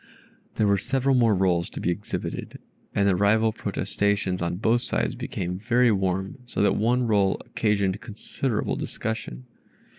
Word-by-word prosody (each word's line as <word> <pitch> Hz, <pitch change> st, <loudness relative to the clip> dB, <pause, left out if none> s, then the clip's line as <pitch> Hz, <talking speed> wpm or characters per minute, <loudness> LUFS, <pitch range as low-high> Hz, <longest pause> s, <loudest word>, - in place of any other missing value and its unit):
There 110 Hz, -, +2 dB
were 100 Hz, -1 st, +3 dB
several 135 Hz, +6 st, +1 dB
more 115 Hz, -4 st, +4 dB
rolls 90 Hz, -2 st, +1 dB
to -, -, -7 dB
be 90 Hz, -, 0 dB
exhibited, 100 Hz, +4 st, -5 dB, 0.4 s
and 100 Hz, -, +3 dB
the 95 Hz, -, +4 dB
rival 110 Hz, +3 st, +3 dB
protestations 100 Hz, -4 st, -1 dB
on 85 Hz, 0 st, -1 dB
both 110 Hz, +5 st, +2 dB
sides -, -, -1 dB
became 90 Hz, 0 st, -4 dB
very 120 Hz, +2 st, +3 dB
warm, 95 Hz, +3 st, -1 dB
so 110 Hz, -, -1 dB
that -, -, +3 dB
one 120 Hz, +3 st, +2 dB
roll 100 Hz, -4 st, +2 dB
occasioned 100 Hz, -2 st, 0 dB
considerable 115 Hz, +1 st, -3 dB
discussion. 110 Hz, -, -5 dB
100 Hz, 150 wpm, -25 LUFS, 95-115 Hz, 0.4 s, more